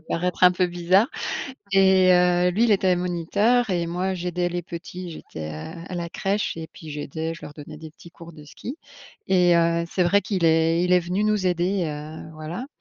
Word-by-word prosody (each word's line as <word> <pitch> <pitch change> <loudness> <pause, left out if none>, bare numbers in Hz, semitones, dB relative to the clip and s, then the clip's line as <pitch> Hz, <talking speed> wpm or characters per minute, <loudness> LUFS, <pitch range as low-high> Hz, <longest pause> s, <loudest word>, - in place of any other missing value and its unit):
paraître 180 +3 -1
un 180 - +8
peu 180 0 +1
bizarre 175 +6 +2 0.6
et 190 -1 +5
heu, 180 0 +4
lui, 215 +6 +2
il 230 - +2
était 185 -2 +3
moniteur 195 +7 +1
et 175 -2 0
moi, 180 +3 -2
j'aidais 180 -1 -2
les 175 0 -2
petits, 175 +1 -8
j'étais, 80 - -8
heu, 160 - -8
à - - -6
la 170 -1 -4
crèche 200 +4 -1
et 160 0 -6
puis 160 - -11
j'aidais 155 +2 -4
je 165 - -12
leur 145 - -9
donnais 150 0 -10
des 160 0 -10
petits 170 +2 -16
cours 170 -1 -13
de 150 -1 -13
ski. 240 - -8 0.5
Et 180 -2 +4
heu, 170 0 +2
c'est 185 - +1
vrai 190 +4 +4
qu'il 190 -5 -2
est 165 +1 +3
il 180 - +1
est 180 - +5
venu 180 +4 -1
nous 210 -3 +1
aider, 180 +1 0
heu, 155 +1 -7
voilà 160 +10 -6
175 Hz, 205 wpm, -24 LUFS, 165-185 Hz, 0.6 s, un